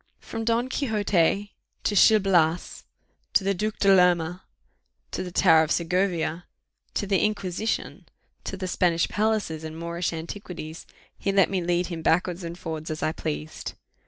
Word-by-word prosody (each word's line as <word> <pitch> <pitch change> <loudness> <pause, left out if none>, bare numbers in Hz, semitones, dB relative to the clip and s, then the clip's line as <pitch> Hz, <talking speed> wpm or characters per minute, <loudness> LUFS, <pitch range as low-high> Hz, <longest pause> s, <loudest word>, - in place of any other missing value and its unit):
From 225 -1 -6
Don 230 +2 +1
Quixote 205 - +1 0.3
to 205 - 0
Gil 215 +2 +7
Blas 175 -4 +1 0.5
to 200 - +4
the 200 +1 +1
Duc 210 +3 -2
de 195 -1 +5
Lerma 180 -1 +3 0.7
to - - -3
the 180 - -5
tower 165 -3 +5
of 160 0 -1
Segovia 175 -1 0 0.5
to - - 0
the 195 -2 +2
Inquisition 210 0 -2 0.4
to 195 - -5
the 185 -1 -4
Spanish 170 -2 +2
palaces 210 -7 0
and 160 0 -7
Moorish 170 +1 -2
antiquities, 165 -1 -7 0.3
he 200 - 0
let 195 -1 +4
me 190 -2 0
lead 175 +1 +1
him 170 -2 -5
backwards 175 +2 +1
and 170 +1 -6
forwards 160 -2 -5
as 155 0 -4
I 155 - +1
pleased. 75 - -5
180 Hz, 160 wpm, -26 LUFS, 165-200 Hz, 0.7 s, Gil